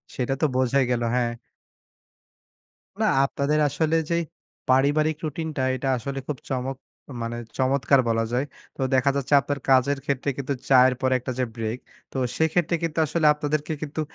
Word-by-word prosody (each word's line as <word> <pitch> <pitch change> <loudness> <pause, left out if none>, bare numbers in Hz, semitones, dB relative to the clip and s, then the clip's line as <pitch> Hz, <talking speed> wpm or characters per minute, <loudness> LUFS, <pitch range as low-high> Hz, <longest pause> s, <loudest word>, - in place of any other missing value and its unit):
সেটা 130 +1 -1
তো - - +4
বোঝাই 130 +1 +3
গেল, 120 -1 0
হ্যাঁ। 120 -1 +1 1.7
না, - - +4 0.2
আপনাদের 145 +2 0
আসলে 160 +3 0
যেই 170 0 +2 0.5
পারিবারিক 145 +4 +3
রুটিনটা, 155 -2 -3
এটা 130 +1 -3
আসলে 135 +3 -5
খুব 145 - -3
চমক 130 0 -2 0.5
মানে 115 0 -3 0.2
চমৎকার 135 +1 +3
বলা 115 0 +1
যায়। 125 +3 +1 0.3
তো - - -9
দেখা 130 +1 +3
যাচ্ছে 140 +1 0
আপনার 140 +1 -3
কাজের 135 +1 +4
ক্ষেত্রে 140 0 -1
কিন্তু 140 0 -2 0.2
চায়ের 130 -1 +6
পরে 130 0 +2
একটা 130 +1 -5
যে 130 - +2
ব্রেক, 115 +2 -3 0.3
তো - - -7 0.2
সেক্ষেত্রে 165 +1 +2
কিন্তু 165 -1 -2
আসলে 160 +1 +1
আপনাদেরকে 150 +1 -2
কিন্তু 155 +1 -3
140 Hz, 155 wpm, -24 LUFS, 130-150 Hz, 1.7 s, চায়ের